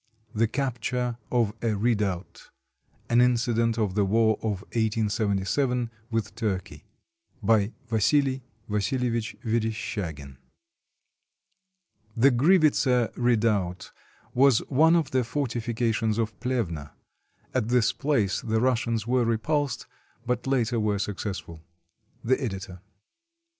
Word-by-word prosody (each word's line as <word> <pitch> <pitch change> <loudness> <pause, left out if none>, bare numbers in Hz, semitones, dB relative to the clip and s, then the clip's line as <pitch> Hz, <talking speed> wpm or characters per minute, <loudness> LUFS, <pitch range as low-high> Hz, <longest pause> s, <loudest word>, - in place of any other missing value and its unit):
THE 110 +1 +2
CAPTURE 125 -1 -2
OF 115 -4 +2
A 115 -2 0
REDOUBT 100 -6 -1 0.6
[An 120 +1 +4
incident 115 -2 +2
of 105 -4 0
the 105 +1 +2
war 110 +2 +3
of 105 -4 -2
1877 110 +2 0 0.2
with 110 -3 -2
Turkey] 95 -8 -4 0.6
BY 105 0 +3 0.2
VASILI 130 +4 +2 0.3
VASILEVICH 115 +2 -1
VERESHCHAGIN 100 - -3 1.8
[The 135 +5 +6
Grivitsa 135 - +3
Redoubt 105 -7 0 0.4
was 130 -2 +4
one 160 +5 +5
of 165 -4 +1
the 130 -1 +2
fortifications 115 -3 -1
of 110 -1 -1
Plevna. 100 - -2 0.6
At 105 - 0
this 120 -2 +3
place 135 -10 0
the 110 -1 0
Russians 115 -3 0
were 125 +1 +2
repulsed, 135 +5 0 0.4
but 125 +1 -2
later 120 -3 +1
were 105 -1 +1
successful. 95 -5 -5 0.6
The 130 +4 +1
Editor. 95 -5 -5
115 Hz, 105 wpm, -26 LUFS, 105-125 Hz, 1.8 s, The